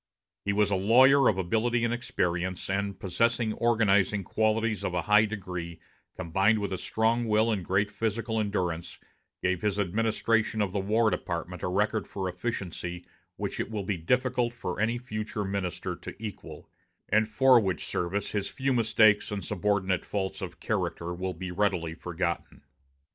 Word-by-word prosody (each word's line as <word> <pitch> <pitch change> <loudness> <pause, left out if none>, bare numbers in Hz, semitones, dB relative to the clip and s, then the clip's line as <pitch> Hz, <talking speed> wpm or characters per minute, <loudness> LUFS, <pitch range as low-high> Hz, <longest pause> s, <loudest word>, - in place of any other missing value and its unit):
He 100 - +1
was 105 0 +2
a - - +3
lawyer 130 +8 +6
of 95 - 0
ability 115 +6 +1
and 120 - 0
experience, 90 -6 -2
and, 100 0 -2
possessing 115 +3 +1
organizing 105 -4 +2
qualities 110 +1 0
of 90 - -2
a 85 - 0
high 105 +2 +5
degree 90 -5 -6 0.4
combined 95 +6 +2
with 100 -2 -2
a 95 - -3
strong 115 +2 +1
will 110 +1 +3
and 100 -4 -1
great 100 +3 +1
physical 110 +1 -1
endurance, 90 -5 -2 0.5
gave 90 -1 +1
his 105 -2 0
administration 110 +2 +1
of 100 -3 +1
the 100 - -1
War 110 +3 +2
Department 85 0 -4
a - - -1
record 105 +4 0
for 95 -2 -4
efficiency 90 -3 -4 0.3
which - - -4
it - - -2
will 105 -3 -3
be 100 +1 -1
difficult 125 +6 +1
for 90 -6 -4
any 115 +3 +1
future 110 -3 -4
minister 95 -3 -3
to - - -9
equal; 105 -1 -8 0.4
and 110 +1 +3
for 130 +1 +6
which 95 -5 -2
service 95 +3 -2
his 100 -2 -2
few 135 0 -1
mistakes 110 -2 +4
and 100 -3 -4
subordinate 95 -1 0
faults 95 -2 -3
of - - -6
character 85 +1 -2
will 90 +1 -4
be 90 +2 -5
readily 90 -4 0
forgotten. 85 -1 -4
105 Hz, 165 wpm, -28 LUFS, 95-110 Hz, 0.5 s, lawyer